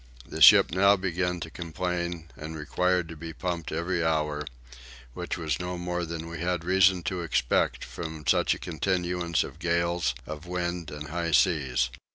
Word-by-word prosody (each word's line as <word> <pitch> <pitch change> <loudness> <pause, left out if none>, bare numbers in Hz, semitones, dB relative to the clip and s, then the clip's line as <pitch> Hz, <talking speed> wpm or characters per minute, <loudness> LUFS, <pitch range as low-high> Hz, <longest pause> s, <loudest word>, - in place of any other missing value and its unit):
The - - -7
ship - - +9
now 100 +3 +5
began 90 -1 -1
to 80 - -6
complain 85 -1 -4
and 80 +1 -7
required 90 +3 0
to 80 - -7
be 80 +1 -7
pumped 85 -1 -4
every 85 +2 -1
hour; 75 -2 0 0.7
which - - -4
was 80 -1 -2
no 90 0 -4
more 90 0 -2
than 80 0 -5
we 85 0 -7
had 90 -1 -1
reason 95 0 +4
to 90 +2 -2
expect 75 -7 +1
from 80 -2 -7
such - - +3
a - - -8
continuance 90 0 -1
of - - -10
gales 85 -5 0
of 75 +3 -8
wind 90 -2 -3
and 75 0 -7
high 85 0 -2
seas. 65 -4 +2
85 Hz, 170 wpm, -27 LUFS, 80-90 Hz, 0.7 s, ship